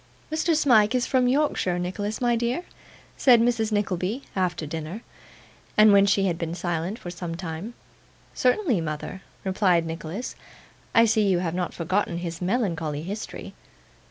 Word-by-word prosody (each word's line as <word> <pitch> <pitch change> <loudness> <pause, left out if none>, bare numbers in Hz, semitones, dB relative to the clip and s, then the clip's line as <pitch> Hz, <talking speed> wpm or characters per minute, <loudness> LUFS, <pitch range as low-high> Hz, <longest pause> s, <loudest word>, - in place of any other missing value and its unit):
'Mr. 315 +1 +1
Smike 245 -7 +4
is 250 0 +1
from 255 -2 +2
Yorkshire, 255 -9 +1
Nicholas, 205 +4 -3
my 240 -1 +2
dear?' 240 +9 -1 0.5
said 250 -4 +6
Mrs. 230 -2 +1
Nickleby, 205 +4 -1
after 175 -4 -1
dinner, 160 +7 -6 0.7
and 215 -1 +7
when 200 0 +6
she 195 0 +3
had 170 -3 -1
been 165 0 -3
silent 175 +3 -2
for 175 - -7
some 175 -1 -5
time. 175 +6 -6 0.6
'Certainly, 255 - +2
mother,' 155 +4 -5 0.2
replied 185 -3 +2
Nicholas. 165 +7 -5 0.6
'I 230 - +7
see 220 -2 +3
you 190 -2 +3
have 175 -2 -2
not 180 0 -3
forgotten 175 +1 -1
his 170 -1 -5
melancholy 170 -7 -1
history. 205 +5 -6
195 Hz, 150 wpm, -25 LUFS, 170-230 Hz, 0.7 s, and